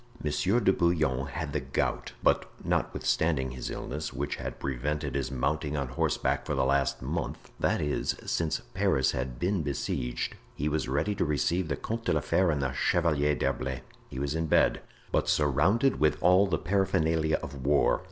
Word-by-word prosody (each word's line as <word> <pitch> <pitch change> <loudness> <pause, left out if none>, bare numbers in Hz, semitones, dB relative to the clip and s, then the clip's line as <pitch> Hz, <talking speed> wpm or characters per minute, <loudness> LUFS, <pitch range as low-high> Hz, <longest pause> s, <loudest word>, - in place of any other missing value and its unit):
Monsieur 90 +9 +2
de 100 -4 +3
Bouillon 75 -8 +1
had 75 +1 -4
the 75 - +1
gout, - - -2
but - - +3 0.2
notwithstanding 70 -5 0
his 65 0 -5
illness, 75 +1 -4
which 70 +2 -3
had - - -6
prevented 70 +2 -2
his 70 -2 -1
mounting 75 +3 -1
on 70 -3 -2
horseback 65 - 0
for - - -2
the - - +2
last 70 0 +1
month— - - -4
that - - +1
is, 75 -1 -1
since 80 -2 0
Paris 65 -1 +2
had 65 -1 -3
been 95 +3 0
besieged—he 70 0 -3
was 75 -2 0
ready 75 +9 +1
to - - 0
receive 85 +4 0
the 70 - -1
Comte 115 - -4
de - - +2
la - - +1
Fere 95 -1 +2
and 75 -3 0
the 65 - 0
Chevalier 75 0 +2
d'Herblay. 65 -2 -2 0.3
He - - -8
was 70 +1 -1
in 80 0 -1
bed, - - +3 0.3
but - - +1
surrounded 80 - +3
with 75 -1 +3
all 90 +3 +6
the 85 -4 +1
paraphernalia 80 -4 +1
of 70 -1 -7
war. 70 +1 +3
75 Hz, 175 wpm, -29 LUFS, 70-85 Hz, 0.3 s, all